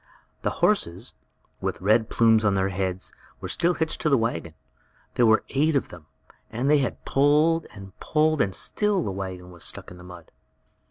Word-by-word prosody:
The - - 0 0.2
horses, 95 - 0 0.5
with - - -3
red 110 +4 +2
plumes 115 -1 +4
on 100 -2 +2
their 95 0 +1
heads, 95 -1 -3 0.3
were - - -6
still 175 +1 +1
hitched 160 -1 -2
to 155 - +1
the 140 - +4
wagon. 85 -8 -3 0.6
There 120 - +3
were 110 0 +4
eight 150 +3 +1
of 140 - 0
them, 85 -4 -13 0.4
but 120 +3 -4
they 150 0 +5
had 130 - -3
pulled 150 +4 +3
and 95 -3 -12
pulled, 155 -1 +1
and 95 -1 0
still 210 -4 +1
the 100 - -3
wagon 95 -2 -6
was 85 -1 -9
stuck - - -6
in 90 - -11
the - - -12
mud. 90 -2 -13
110 Hz, 185 wpm, -25 LUFS, 95-150 Hz, 0.6 s, they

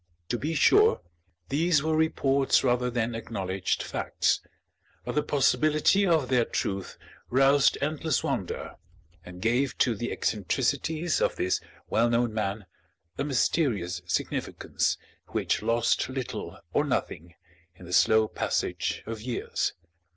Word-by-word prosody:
To 120 - 0
be 160 +3 -2
sure, 420 - +5 0.5
these 155 +1 +2
were 160 0 +1
reports 140 -4 +2
rather 125 -1 +2
than 120 -1 -1
acknowledged 95 -5 -2
facts, - - 0 0.6
but - - -3
the 150 - +2
possibility 155 +7 +3
of 160 -6 +2
their 125 -2 +3
truth 95 -4 -3 0.3
roused 135 +2 +4
endless 155 -1 0
wonder - - -3 0.5
and 90 +1 -10
gave 125 +4 +1
to 120 - +3
the 120 +3 -4
eccentricities 140 - -1
of - - +1
this 90 - 0 0.3
well 115 +2 +2
known 120 -1 +1
man 105 -1 -2 0.5
a - - +1
mysterious 120 - 0
significance 85 - -1 0.3
which - - -1
lost 115 +3 +1
little 130 -2 -5 0.2
or - - +3
nothing 85 +2 -3 0.4
in 90 - -13
the 90 - -7
slow 110 +3 +5
passage - - -2
of 110 -1 -6
years. 120 +1 -2
125 Hz, 130 wpm, -27 LUFS, 110-145 Hz, 0.6 s, sure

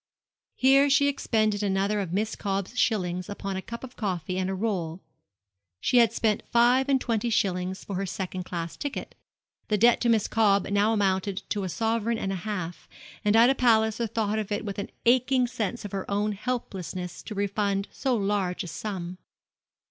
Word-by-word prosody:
Here 275 +2 +5
she 285 +1 +4
expended 215 -6 +1
another 200 +1 +1
of 190 -4 -3
Miss 210 +4 -1
Cobb's 195 +2 -3
shillings 180 -6 0
upon 200 -1 -4
a 190 - -3
cup 235 +5 -8
of 255 -1 -9
coffee 185 -4 -2
and 185 0 -1
a 190 - -1
roll. 185 -5 -2 0.8
She 250 - +2
had 235 -2 +6
spent 215 -2 +1
five 245 +3 +4
and 270 -1 +4
twenty 235 -2 -1
shillings 190 -3 0
for 195 - -4
her 195 +1 -2
second 185 0 -4
class 170 -2 -5
ticket. 285 -1 -5 0.5
The 210 - +1
debt 235 +3 +5
to 240 - +2
Miss 220 -3 +3
Cobb 205 -3 +3
now 205 +2 +3
amounted 195 -2 0
to 205 - -1
a - - -3
sovereign 225 +3 0
and 195 - -2
a - - -1
half; 180 -3 -5 0.3
and 210 0 +3
Ida 235 +4 +7
Palliser 225 -2 +2
thought 215 -1 -1
of 210 -1 -4
it 205 +1 -2
with 200 -1 -4
an 200 - -4 0.2
aching 255 +1 +4
sense 235 -2 -3
of 205 - -6
her 195 -1 -4
own 205 +1 0
helplessness 190 -5 -4
to 215 - -8
refund 200 0 0
so 260 -3 0
large 195 -3 0
a - - -7
sum. 180 +2 -5
205 Hz, 185 wpm, -27 LUFS, 190-230 Hz, 0.8 s, Ida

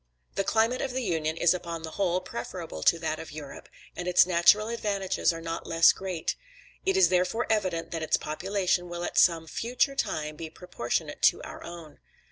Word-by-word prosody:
The 195 - 0
climate 225 +5 +2
of 265 - -3
the 260 0 -2
Union 160 -5 -1
is 175 0 +4
upon 170 -2 -5
the 160 - -6
whole 185 -1 0
preferable 180 - -6
to 170 - +4
that 160 -1 -3
of 160 - -8
Europe, 145 -2 -9 0.3
and 175 - -5
its 180 -1 +6
natural 180 +4 +4
advantages 200 -6 0
are 165 0 -7
not 165 0 -5
less 165 0 +6
great; 185 -4 -3 0.5
it 385 0 +3
is 380 - +6
therefore 185 +6 +1
evident 185 -6 0
that 165 - -3
its 160 - +2
population 180 +2 -1
will 175 0 -5
at - - +1
some 165 -2 +4
future 245 - -1
time 155 - -2
be 160 0 -6
proportionate 155 -8 -4
to - - +4
our - - -9
own. 170 -3 -10
175 Hz, 190 wpm, -28 LUFS, 165-200 Hz, 0.5 s, its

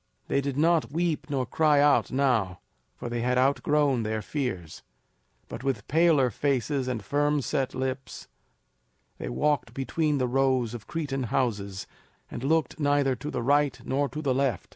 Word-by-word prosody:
They 140 - +2
did 140 -1 -3
not 165 -1 +2
weep 165 -1 -1
nor 135 -3 0
cry 150 +4 +3
out 145 0 +4
now, 125 -9 +1 0.4
for - - -7
they 120 0 -2
had 125 +1 +1
outgrown 140 0 +2
their 110 -1 -2
fears. 95 - -4 0.7
But - - -8
with 130 -7 -2
paler 155 -5 +3
faces 135 +2 -1
and 120 -6 -3
firm 145 +3 +1
set 130 +2 -2
lips, 130 0 -4 0.9
they - - -4
walked 125 - 0
between 150 +2 0
the 130 - +1
rows 130 -2 +1
of 115 -3 -8
Cretan 140 -5 -3
houses, 100 -6 -2 0.5
and - - -6
looked 155 0 0
neither 145 -2 +2
to 145 +5 -6
the - - -3
right 145 0 +2
nor 140 +1 0
to 150 +5 -6
the 135 -3 +1
left. 130 -6 -1
135 Hz, 165 wpm, -27 LUFS, 120-145 Hz, 0.9 s, out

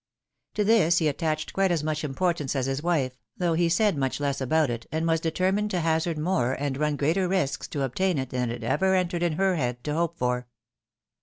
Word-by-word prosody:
To 210 - +2
this 200 -6 +4
he 160 - +2
attached 155 +1 -2
quite 195 0 +2
as 170 -4 0
much 155 0 -2
importance 150 -1 -1
as 130 -2 0
his 135 +1 -2
wife, 145 -7 0 0.2
though 175 -2 +1
he 170 +1 +2
said 205 +3 +2
much 135 -1 -1
less 140 -1 -1
about 150 +1 +2
it, 115 -1 -5
and 160 +1 -1
was 165 0 +2
determined 185 +6 0
to 185 - -1
hazard 160 0 0
more, 150 -6 +1
and 140 -1 -2
run 150 +1 0
greater 165 +7 +1
risks 180 -7 -1
to 140 -3 -3
obtain 175 +7 0
it, 130 -2 -3
than 125 -1 -1
it 120 0 -5
ever 190 +11 +2
entered 180 -2 0
into 170 -3 0
her 190 -2 +2
head 125 -3 -2
to 150 - -2
hope 170 +1 -1
for. 125 -2 -1
160 Hz, 220 wpm, -26 LUFS, 135-175 Hz, 0.2 s, this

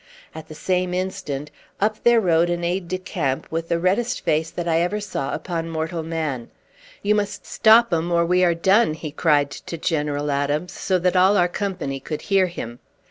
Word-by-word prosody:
At 160 - -9
the 155 - -10
same 180 +2 -1
instant 180 -6 -4 0.3
up 215 +1 0
there 240 -1 +6
rode 175 -4 +3
an 175 0 -2
aide 175 +1 -1
de 185 +2 -2
camp, 165 -8 -2
with 165 +1 -3
the 170 - +2
reddest 200 +8 0
face 160 -1 0
that 175 +1 -5
ever 170 +4 +1
I - - -1
saw 185 -9 -4
upon 165 -2 -3
mortal 165 +1 -3
man. 155 -7 -3 0.5
"You 205 +1 +3
must 205 -1 -2
stop 225 -1 +5
'em, 165 +1 0
or 170 0 +3
we 180 +2 +3
are 170 -2 +3
done!" 190 +1 +3
he 155 -1 -6
cried 145 -2 +2
to 165 - -7
General 150 -3 -1
Adams, 145 +5 -1
so 185 - 0
that 180 +1 +1
all 190 +3 +5
our 175 - +4
company 180 -8 -3
could 150 +3 -6
hear 190 -1 +5
him. 120 -9 -7
170 Hz, 195 wpm, -22 LUFS, 155-185 Hz, 0.5 s, there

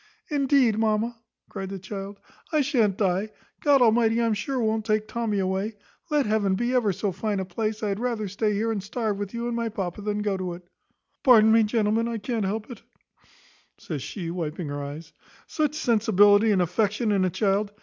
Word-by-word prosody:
`Indeed, 275 -6 +3
mamma,' 225 +1 0 0.3
cried 195 -2 -6
the 195 - -5
child, 195 +1 -7 0.3
`I 305 -2 +3
shan't 230 - +1
die; 195 +1 0 0.3
God 280 -3 +5
Almighty, 225 0 +3
I'm 230 -1 +2
sure, 260 +6 -2
won't 220 -1 0
take 215 0 0
Tommy 225 -2 -2
away; 190 +3 -1 0.3
let 295 -3 +2
heaven 210 -3 +1
be 240 +5 -1
ever 235 -5 +2
so 195 +2 -2
fine 200 +2 -2
a 190 - -2
place, 215 +4 -3
I 210 - 0
had 200 +1 -2
rather 235 -4 -2
stay 210 +3 -1
here 220 +3 0
and 210 -3 -2
starve 210 0 -3
with 200 -1 -4
you 235 0 -3
and 240 -1 -2
my 230 -1 -1
papa 195 -2 -4
than 210 0 -2
go 200 -2 0
to 185 -2 -4
it.' 175 0 -12 0.5
Pardon 220 -4 +6
me, 225 0 +6
gentlemen, 220 +1 +1
I 235 -1 -2
can't 220 0 -2
help 215 +5 -3
it" 245 - -10 1.0
(says 150 -5 -6
she, 170 +4 -5
wiping 165 -2 -4
her 145 0 -4
eyes), 145 +3 -8 0.3
"such 300 -1 -1
sensibility 215 -5 +4
and 190 -3 +3
affection 210 +5 0
in 195 -2 +2
a 185 - +2
child. 200 +2 0
215 Hz, 200 wpm, -25 LUFS, 195-230 Hz, 1.0 s, Pardon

